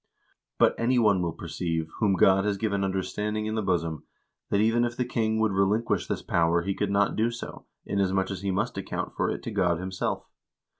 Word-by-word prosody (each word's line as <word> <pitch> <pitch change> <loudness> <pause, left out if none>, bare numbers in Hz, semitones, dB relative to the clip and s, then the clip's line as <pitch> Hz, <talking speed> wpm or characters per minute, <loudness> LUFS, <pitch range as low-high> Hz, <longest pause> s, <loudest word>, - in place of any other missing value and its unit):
But - - +5
any 125 +2 +2
one 105 -5 +4
will 85 -1 -1
perceive, 80 -1 -3
whom 105 -4 +3
God 95 +2 +5
has 105 -1 0
given 100 -2 0
understanding 105 +3 -2
in 110 - -2
the 110 - 0
bosom, 85 -5 -1 0.5
that 100 - +2
even 115 +3 +3
if 120 0 -2
the 125 - 0
king 110 -2 0
would 110 -1 +2
relinquish 100 +2 +1
this - - -3
power 85 0 +2
he 100 +2 -1
could 105 +1 -1
not 100 0 +2
do 110 +2 +2
so, 120 0 -8 0.2
inasmuch 95 -1 0
as 95 -2 -5
he 100 - -2
must 95 +1 -1
account - - -4
for - - 0
it - - -4
to 115 - -4
God 90 -5 +1
himself. 95 +1 -3
100 Hz, 205 wpm, -27 LUFS, 95-110 Hz, 0.5 s, But